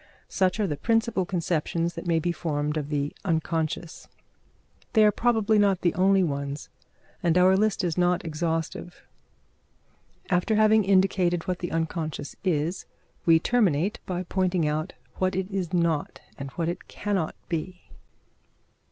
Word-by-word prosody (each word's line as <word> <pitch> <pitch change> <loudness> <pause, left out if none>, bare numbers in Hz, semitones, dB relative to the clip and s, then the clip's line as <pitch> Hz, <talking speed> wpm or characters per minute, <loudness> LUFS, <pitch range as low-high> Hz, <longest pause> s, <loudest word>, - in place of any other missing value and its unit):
Such 190 +2 +1
are 210 - +2
the 150 -6 -2
principal 225 0 +1
conceptions 170 -1 -1
that - - -7
may 165 -1 +2
be 175 +2 0
formed 150 -3 -2
of 150 -2 -3
the 145 -1 -2
unconscious. 160 -2 -2 0.9
They 220 -2 +6
are 210 - +6
probably 220 -1 +2
not 195 -3 +3
the 175 - +2
only 190 +1 +4
ones, 140 -2 -3 0.5
and 170 0 +2
our 185 +1 +6
list 210 0 +1
is 175 -1 -1
not 175 0 +2
exhaustive. 165 +2 -3 1.3
After 180 +5 +2
having 215 0 +5
indicated 185 -3 +2
what 180 -1 -1
the 175 - -4
unconscious 160 -2 -3
is, 170 -1 -1 0.4
we 165 - +7
will 160 - +3
terminate 200 -6 +1
by 180 -1 -2
pointing 185 -2 0
out 155 +1 -2 0.2
what 185 -1 0
it 190 +1 -2
is 190 -4 -2
not 170 -4 0 0.2
and 140 0 -6
what 165 -1 -2
it 175 +2 -4
cannot 195 -6 -2
be. 180 +2 -4
175 Hz, 150 wpm, -26 LUFS, 160-190 Hz, 1.3 s, we